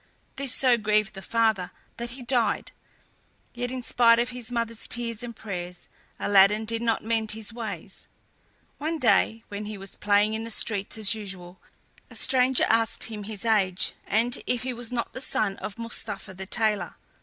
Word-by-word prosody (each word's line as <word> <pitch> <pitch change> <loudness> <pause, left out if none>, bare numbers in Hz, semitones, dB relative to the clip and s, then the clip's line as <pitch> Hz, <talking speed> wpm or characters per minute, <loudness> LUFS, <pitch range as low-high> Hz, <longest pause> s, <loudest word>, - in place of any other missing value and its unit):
This 270 -1 -2
so 250 -2 +3
grieved 215 0 +2
the 195 - -8
father 220 -4 +1 0.3
that 235 0 -4
he 250 +1 -9
died; 240 -1 +1 0.8
yet, 245 0 -3
in 255 0 -4
spite 230 -1 +5
of 240 +1 +1
his 245 -2 -6
mother's 230 -2 -2
tears 230 -2 -1
and 240 -1 -6
prayers, 180 -4 -6 0.3
Aladdin 205 +2 +5
did 230 +1 -2
not 230 -2 +1
mend 220 -1 0
his 220 0 -5
ways. 200 -6 -7 0.7
One 320 +3 -1
day, 225 -4 +3
when 205 +1 -5
he 210 0 -5
was 195 -1 -8
playing 210 +1 +3
in 220 +1 -2
the 230 - -5
streets 205 -2 -2
as 215 -1 +2
usual, 190 -4 -8 0.5
a - - -11
stranger 260 -1 +3
asked 225 0 +2
him 215 -2 -4
his 215 0 -6
age, 190 -4 +2
and 235 +3 +2
if 245 -1 0
he 255 0 -2
was 240 -1 -4
not 235 -2 -2
the 255 - -4
son 210 -6 0
of 205 - -6
Mustapha 215 -4 -2
the 190 +1 -8
tailor. 210 -5 0
220 Hz, 180 wpm, -27 LUFS, 205-235 Hz, 0.8 s, spite